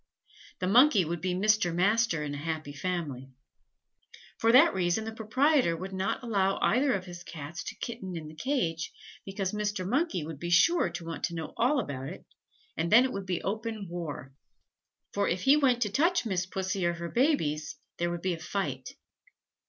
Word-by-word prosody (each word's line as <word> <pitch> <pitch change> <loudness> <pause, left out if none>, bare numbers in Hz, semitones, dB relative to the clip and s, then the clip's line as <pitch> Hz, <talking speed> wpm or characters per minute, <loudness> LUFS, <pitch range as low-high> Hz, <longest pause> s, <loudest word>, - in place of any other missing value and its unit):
The 185 - -3
Monkey 220 - +5
would 170 +1 -3
be 185 -1 -1
Mr. 210 -2 +2
Master 200 -3 +2
in 145 -1 -4
a - - -4
happy 155 -1 -4
family. 145 -5 -4 1.1
For 225 - +4
that 285 +8 +7
reason 180 +3 0
the 225 - -5
proprietor 240 - +2
would 190 +3 -6
not 190 +7 -2
allow 195 -4 +1
either 260 +3 +3
of 185 -2 -2
his 175 -1 -9
Cats 165 +2 -7
to - - -6
kitten 190 -7 -6
in 155 -2 -7
the 155 - -10
cage, 165 - -1 0.4
because 195 -1 -2
Mr. 210 -3 -2
Monkey 265 - 0
would 155 -3 -7
be 170 - -4
sure 325 - +4
to 175 0 -7
want 165 0 -6
to 170 - -5
know 160 -2 -5
all 265 +5 +2
about 135 - -4
it, 180 - -10 0.5
and 170 +2 -1
then 235 +4 +8
it 260 - -3
would 195 -1 -5
be 180 -2 -2
open 220 0 -3
war, 150 -6 -6 0.8
for 200 0 +1
if 180 +1 -1
he 275 +2 +6
went 255 -5 +3
to 210 - -2
touch 335 - +2
Miss 185 -4 -1
Pussy 190 0 -2
or 170 0 +2
her 170 0 -5
babies, 160 - 0 0.2
there 175 0 +1
would 170 0 -5
be 185 -1 +1
a 165 - -6
fight. 155 -6 -4
185 Hz, 190 wpm, -29 LUFS, 170-225 Hz, 1.1 s, then